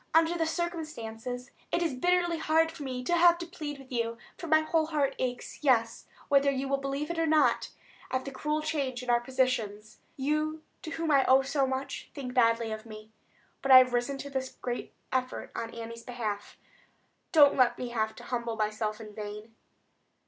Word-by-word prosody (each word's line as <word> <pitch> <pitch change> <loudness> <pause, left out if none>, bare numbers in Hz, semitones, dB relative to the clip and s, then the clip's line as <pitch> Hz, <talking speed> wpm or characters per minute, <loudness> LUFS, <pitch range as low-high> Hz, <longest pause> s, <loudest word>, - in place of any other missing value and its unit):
Under 330 +1 +5
the 325 -2 0
circumstances, 265 -8 -4 0.2
it 345 - +1
is 325 -5 0
bitterly 345 +4 +1
hard 320 +1 +3
for - - -11
me 255 -2 -4
to 345 - 0
have 345 0 +6
to 345 - -5
plead 305 -4 -6
with 270 -1 -15
you; 230 -1 -1 0.2
for 340 - -7
my 315 0 +5
whole 315 0 +1
heart 290 -3 0
aches, 250 +3 -4
yes—whether 275 +2 +2
you 270 0 -1
will 275 0 0
believe 275 +3 -3
it 340 - -3
or 325 - +2
not—at 300 -3 0
the 275 - -5
cruel 300 +3 -2
change 275 -5 -2
in 250 - 0
our 240 - +4
positions. 235 -5 -1 0.2
You, 305 +3 -1 0.2
to - - -6
whom 325 -1 -2
I 275 -2 +5
owe 265 +1 +5
so 275 0 +1
much, 265 +1 -4
think 260 -4 -5
badly 230 -2 +3
of 220 0 -5
me. 215 0 -11 0.5
But 270 - +1
I 260 - +12
have 255 -1 +6
risen 245 +3 0
to 280 +1 -7
this 260 -1 -2
great 245 -1 -4 0.2
effort 255 -1 -2
on 230 - -3
Annie's 230 0 -7
behalf. 220 -5 -5 0.7
Don't 295 -5 +7
let 240 -2 +3
me 250 - -4
have 220 -2 -1
to - - -11
humble 235 -2 -3
myself 215 0 -2
in 215 -2 -10
vain." 210 +1 -7
265 Hz, 190 wpm, -29 LUFS, 235-310 Hz, 0.7 s, I